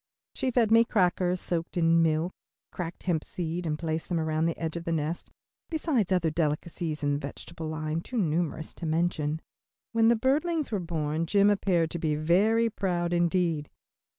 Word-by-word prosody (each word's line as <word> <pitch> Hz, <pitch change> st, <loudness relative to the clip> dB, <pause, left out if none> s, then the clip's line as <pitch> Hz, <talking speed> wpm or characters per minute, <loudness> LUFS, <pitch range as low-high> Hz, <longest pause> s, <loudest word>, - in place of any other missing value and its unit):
She 265 Hz, -, -1 dB
fed 235 Hz, -3 st, +2 dB
me 230 Hz, +1 st, +7 dB
crackers 185 Hz, -4 st, +1 dB
soaked 170 Hz, +1 st, -3 dB
in 165 Hz, 0 st, +4 dB
milk, 160 Hz, +2 st, +1 dB, 0.4 s
cracked 170 Hz, -1 st, -6 dB
hemp 170 Hz, -4 st, 0 dB
seeds 170 Hz, 0 st, -4 dB
and 150 Hz, -1 st, -1 dB
placed 160 Hz, 0 st, -3 dB
them 175 Hz, -2 st, 0 dB
around 160 Hz, 0 st, +1 dB
the 165 Hz, -, -2 dB
edge 160 Hz, -1 st, -3 dB
of 170 Hz, -, -4 dB
the 170 Hz, -, -2 dB
nest, 160 Hz, +1 st, -2 dB, 0.4 s
besides 290 Hz, -, 0 dB
other 175 Hz, -4 st, +2 dB
delicacies 155 Hz, 0 st, -2 dB
in 145 Hz, 0 st, +2 dB
the 140 Hz, -, 0 dB
vegetable 155 Hz, +3 st, -7 dB
line 155 Hz, +1 st, -2 dB
too 250 Hz, -, -6 dB
numerous 165 Hz, -3 st, -1 dB
to 170 Hz, -, -6 dB
mention. 160 Hz, -1 st, 0 dB, 0.5 s
When 225 Hz, -1 st, +4 dB
the 235 Hz, -, +6 dB
birdlings 295 Hz, +6 st, +1 dB
were 205 Hz, -, 0 dB
born 165 Hz, -2 st, -2 dB
Jim 200 Hz, +3 st, +5 dB
appeared 175 Hz, -5 st, +1 dB
to 170 Hz, -, -3 dB
be 155 Hz, -2 st, 0 dB
very 200 Hz, +9 st, +3 dB
proud 175 Hz, -5 st, -1 dB
indeed. 170 Hz, -3 st, +1 dB
170 Hz, 180 wpm, -28 LUFS, 160-195 Hz, 0.5 s, me